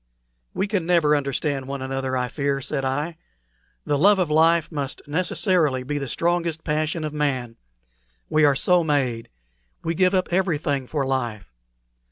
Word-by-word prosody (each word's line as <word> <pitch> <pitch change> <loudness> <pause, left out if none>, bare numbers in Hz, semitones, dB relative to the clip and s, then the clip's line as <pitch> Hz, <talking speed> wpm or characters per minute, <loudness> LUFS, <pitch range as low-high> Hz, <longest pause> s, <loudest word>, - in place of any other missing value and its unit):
"We 195 - 0
can 200 -5 -2
never 165 -4 +4
understand 140 -1 -1
one 135 -1 -4
another, 130 0 -2
I 125 0 -1
fear," 140 +2 -1
said 135 0 -3
I. 145 +5 -2 0.7
"The 145 - 0
love 200 +5 +6
of 180 -5 0
life 165 +2 +3
must 140 -3 -4
necessarily 160 - +1
be 145 +3 -3
the 140 - -4
strongest 170 +2 -1
passion 155 +1 -1
of 155 -1 -4
man. 130 -6 -1 0.7
We 155 - +2
are 145 -2 +5
so 180 +5 +3
made. 130 -7 -1 0.5
We 165 - -1
give 185 +3 +2
up 185 -2 0
everything 150 -7 0
for 145 -1 -1
life. 120 - -3
150 Hz, 160 wpm, -23 LUFS, 135-170 Hz, 0.7 s, love